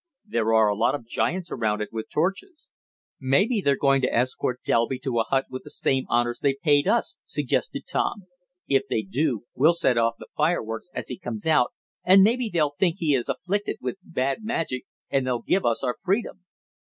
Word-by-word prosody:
"There 115 - 0
are 110 -1 +5
a 105 - +1
lot 110 +6 +2
of 120 - -7
giants 175 +9 -2
around 110 -3 0
it 105 - -3
with 110 -1 -5
torches." 195 - -2 0.5
"Maybe 195 - +2
they're 140 -5 +2
going 135 -1 +3
to 130 - +1
escort 125 +1 -1
Delby 115 +3 +1
to 125 -2 -2
a 115 - +1
hut 135 0 +1
with 130 - -5
the - - -11
same 135 -1 0
honors 120 0 +1
they 140 -2 +1
paid 145 -3 +4
us," 225 -9 +1
suggested 145 -4 -2
Tom. 200 - -1 0.4
"If 135 0 +2
they 110 - 0
do, 120 +3 -1
we'll 155 +6 +4
set 150 -8 +2
off 115 0 +2
the - - -12
fireworks 150 -5 -1
as - - -4
he - - -6
comes 115 - -6
out 150 -6 +3 0.3
and 190 +1 +7
maybe 235 +2 +2
they'll 150 -4 +1
think 175 -4 +2
he 155 -4 +1
is 125 -3 0
afflicted 200 +4 -2
with 195 - -4
bad 135 - -2
magic, 165 - -2 0.3
and 135 -2 +1
they'll 120 -2 -1
give 190 - +1
us 115 +1 0
our 125 -2 0
freedom." 195 -1 -1
135 Hz, 200 wpm, -25 LUFS, 120-175 Hz, 0.5 s, and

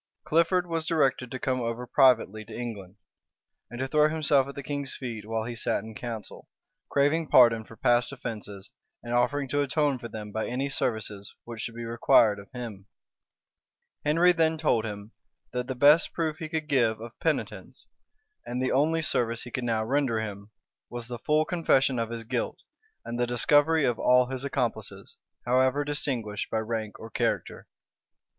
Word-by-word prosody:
Clifford 170 +3 +2
was 165 -2 -2
directed 135 -6 +1
to 130 - -5
come 130 0 -1
over 115 +1 -3
privately 120 -5 +3
to - - -9
England, 105 -6 -6 0.7
and 120 - -8
to 130 - -1
throw 150 +2 +4
himself 145 -4 +2
at 140 - -8
the 140 - -6
king's 140 -1 -4
feet 115 -5 -6
while 110 0 -1
he 120 +1 -5
sat 115 -3 -1
in 110 0 -9
council; 115 -1 -7 0.4
craving 150 +3 +2
pardon 115 -4 +6
for 115 - -14
past 120 +2 +2
offences 105 -6 -7 0.3
and 120 0 -4
offering 140 +3 +1
to 145 +2 +1
atone 145 -1 +1
for 120 - -6
them 105 -2 -8
by 110 +1 -2
any 135 +3 -2
services 110 -6 -3
which 115 -2 -7
should 115 - -5
be 120 0 -6
required 115 -2 +4
of 100 - -13
him. 115 -6 -8 1.2
Henry 165 +4 +4
then 160 -2 +2
told 120 -8 +1
him, 105 0 -7 0.4
that 125 0 -2
the 130 - -3
best 145 +5 +5
proof 160 -2 -1
he 160 -1 -6
could 155 -1 -3
give 120 -6 +2
of 115 +1 -8
penitence, 160 -2 -3 0.6
and 125 +1 -4
the 130 - 0
only 160 +4 +2
service 115 -6 -1
he 120 - -9
could 130 - -3
now 110 -2 0
render 130 -3 +1
him, 100 -2 -6 0.4
was 120 -1 -6
the 120 -1 -5
full 155 +5 +2
confession 140 -7 +2
of 115 -1 -2
his 115 -1 -5
guilt, 125 +1 -2 0.5
and 120 +1 -4
the 120 - +1
discovery 145 +5 +3
of 120 -2 0
all 125 0 +5
his 130 0 -4
accomplices, 140 - -3 0.3
however 130 +3 +2
distinguished 125 -8 -2
by - - -1
rank 110 -1 -3
or 115 - -10
character. - - -2
125 Hz, 180 wpm, -27 LUFS, 115-145 Hz, 1.2 s, pardon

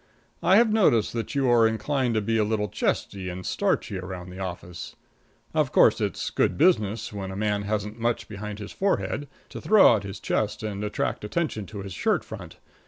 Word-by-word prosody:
I 190 - +5
have 225 0 +5
noticed 150 - +3
that 115 +4 -4
you 135 -2 +2
are 115 -2 +6
inclined 120 +2 0
to 110 - +2
be 115 +2 0
a - - +4
little 105 -1 -1
chesty 95 +1 -2
and 90 +1 -6
starchy 95 - 0
around 90 -1 -7
the 90 - -9
office. 90 -2 -6 0.6
Of - - +1
course, - - +5
it's - - -2
good - - +1
business, 115 - +2
when 95 -2 -5
a 95 - -6
fellow 105 -1 0
hasn't 105 +1 -3
much 120 +1 -1
behind 105 0 -6
his 105 -1 -8
forehead, 190 -6 -1 0.2
to - - -8
throw 210 - +6
out 110 - +1
his 100 0 -7
chest 110 +2 -1
and 105 -1 -3
attract 105 0 -2
attention 110 - -2
to 100 -2 -7
his 95 -2 -7
shirt - - +1
front. - - -9
105 Hz, 195 wpm, -26 LUFS, 100-120 Hz, 0.6 s, are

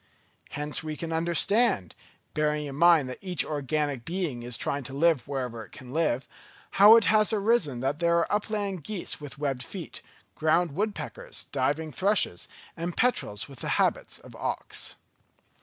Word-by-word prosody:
Hence 150 +1 -1
we 155 -1 -5
can 165 -1 -4
understand, 170 - +2 0.4
bearing 150 0 0
in 140 -2 -6
mind 165 -3 +5
that 130 - -7
each 180 -4 0
organic 145 -2 -2
being 165 -6 -3
is 120 0 -2
trying 140 - -1
to 135 - -7
live 160 -2 +2
wherever 125 -5 -4
it 100 - -16
can 130 0 -11
live, 155 -5 0 0.4
how 210 +3 +9
it 230 - +5
has 215 0 +4
arisen 200 - +1
that 135 +3 -1
there 170 0 +3
are 170 - +1
upland 205 -4 -1
geese 195 -3 -4
with 145 0 -8
webbed 140 -3 -2
feet, 175 +6 -8 0.3
ground 160 +2 +2
woodpeckers, 215 - -4
diving 145 +4 0
thrushes, 190 - +1 0.3
and 170 +1 -4
petrels 120 - +1
with 135 -3 -12
the - - -3
habits - - +1
of - - -14
auks. - - -3
155 Hz, 160 wpm, -27 LUFS, 140-185 Hz, 0.4 s, how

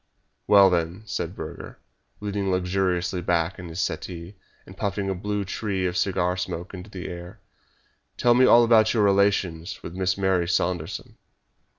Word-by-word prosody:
"Well, 100 -2 +7
then," 85 +3 -1
said 105 - -4
Burger, - - -8 0.4
leaning 100 -1 -2
luxuriously 90 -1 0
back 85 +1 0
in 90 -2 -8
his 80 +2 -6
settee, 90 -1 -4 0.3
and - - -13
puffing 100 -1 -2
a - - 0
blue 105 +2 -3
tree 95 -1 -2
of 90 -1 -1
cigar 90 -2 +1
smoke 90 0 -5
into 95 +2 -9
the 95 -3 -7
air, 90 +4 -8 0.8
"tell 120 - +4
me 125 +1 +5
all 120 - +7
about 115 -1 +4
your 110 - +3
relations 100 -3 +1
with 85 - -7
Miss 95 0 0
Mary 95 -3 +1
Saunderson." 85 -2 -2
95 Hz, 160 wpm, -25 LUFS, 90-100 Hz, 0.8 s, Well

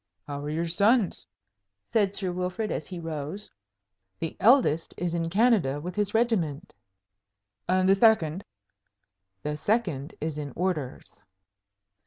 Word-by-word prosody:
"How 145 -1 -5
are 145 - -4
your 160 +3 -1
sons?" 200 +5 +2 0.7
said 205 -3 +2
Sir 185 -2 -1
Wilfrid, 180 +4 -2
as 155 - -3
he 180 -2 -6
rose. 165 +4 -5 0.7
"The 165 - -4
eldest 210 - +4
is 175 -1 -2
in 165 -1 -1
Canada 195 - +3
with 175 +4 -6
his 205 0 -1
regiment." 185 - 0 1.0
"And 185 0 +3
the 195 - +7
second?" 195 -5 +3 1.0
"The 150 0 -2
second 165 - -1
is 155 -1 -3
in 145 -3 -6
orders." 150 - -3
180 Hz, 130 wpm, -27 LUFS, 155-205 Hz, 1.0 s, the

